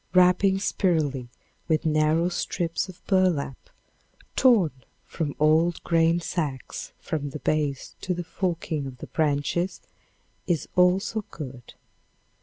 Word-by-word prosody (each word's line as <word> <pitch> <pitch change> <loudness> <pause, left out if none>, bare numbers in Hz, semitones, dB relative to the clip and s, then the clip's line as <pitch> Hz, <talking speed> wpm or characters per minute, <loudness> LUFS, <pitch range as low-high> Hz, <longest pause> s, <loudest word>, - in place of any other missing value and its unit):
Wrapping 185 +2 +5
spirally 155 - 0 0.4
with 160 0 +1
narrow 155 +2 +3
strips 175 0 -2
of 180 - -13
burlap, 180 -9 +1 0.7
torn 220 - +5 0.3
from 150 -4 -3
old 160 +3 +3
grain 165 0 +3
sacks, 155 -6 -4
from 145 -3 -3
the 150 - -6
base 150 -2 -1
to 185 -2 -1
the 175 - -3
forking 165 -5 -2
of 130 -1 -9
the - - -8
branches, 155 +4 0 0.7
is 175 -5 0
also 190 +4 +3
good. 130 -5 -9
165 Hz, 115 wpm, -26 LUFS, 150-180 Hz, 0.7 s, Wrapping